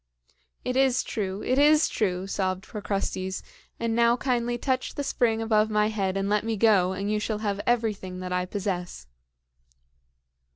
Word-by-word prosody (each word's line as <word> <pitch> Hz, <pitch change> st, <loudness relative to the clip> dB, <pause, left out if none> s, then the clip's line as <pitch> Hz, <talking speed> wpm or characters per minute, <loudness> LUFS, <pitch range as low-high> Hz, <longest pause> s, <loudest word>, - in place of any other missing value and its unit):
"It 250 Hz, -, -1 dB
is 265 Hz, -2 st, +3 dB
true! 195 Hz, -2 st, -3 dB
it 255 Hz, +2 st, +1 dB
is 300 Hz, +2 st, +5 dB
true!" 185 Hz, -3 st, -1 dB
sobbed 190 Hz, -1 st, -2 dB
Procrustes; 195 Hz, -3 st, -3 dB, 0.4 s
"and 230 Hz, -1 st, -1 dB
now 235 Hz, +1 st, +4 dB
kindly 240 Hz, -2 st, 0 dB
touch 260 Hz, +1 st, -1 dB
the 285 Hz, -, -2 dB
spring 225 Hz, -4 st, +1 dB
above 215 Hz, -1 st, +2 dB
my 210 Hz, 0 st, +2 dB
head 195 Hz, -3 st, -1 dB
and 195 Hz, 0 st, -1 dB
let 210 Hz, 0 st, +1 dB
me 225 Hz, -1 st, -2 dB
go, 195 Hz, -4 st, +4 dB
and 200 Hz, +2 st, -2 dB
you 215 Hz, -, +1 dB
shall 210 Hz, 0 st, -2 dB
have 200 Hz, 0 st, -1 dB
everything 210 Hz, -6 st, 0 dB
that 180 Hz, 0 st, -4 dB
I 180 Hz, 0 st, 0 dB
possess." 180 Hz, -, -4 dB
210 Hz, 165 wpm, -26 LUFS, 190-235 Hz, 0.4 s, is